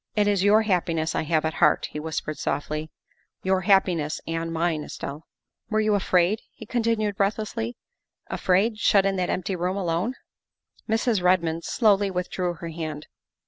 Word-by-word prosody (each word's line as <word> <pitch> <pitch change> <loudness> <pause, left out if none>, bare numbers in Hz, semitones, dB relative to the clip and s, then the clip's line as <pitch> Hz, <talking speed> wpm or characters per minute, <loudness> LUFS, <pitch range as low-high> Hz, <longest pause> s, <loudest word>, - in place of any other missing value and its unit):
" - - -48
It 210 -1 +3
is 200 -2 +2
your 210 +2 +5
happiness 170 -5 0
I - - 0
have 160 0 +1
at 160 - -1
heart," 150 -3 +3
he 150 - -5
whispered 155 -1 -4
softly, 155 +2 -2 0.3
" - - -43
your 190 0 +2
happiness 180 -5 +2
and 165 0 -3
mine, 165 -2 0
Estelle. 145 +2 -7 0.2
" - - -55
Were 215 -1 +1
you 215 -1 +2
afraid," 190 0 +2
he 220 - -11
continued 225 -3 0
breathlessly, 195 - -1 0.2
" - - -50
afraid, 210 +4 +1
shut 200 -2 +4
in 195 0 +1
that 180 -1 0
empty 185 +1 -1
room 180 +2 -1
alone?" 185 +6 -1 0.7
Mrs. 225 -2 +1
Redmond 170 -2 +2
slowly 205 -4 +3
withdrew 180 -1 -2
her 170 +1 -7
hand. 155 -2 -5
180 Hz, 175 wpm, -25 LUFS, 165-205 Hz, 0.7 s, your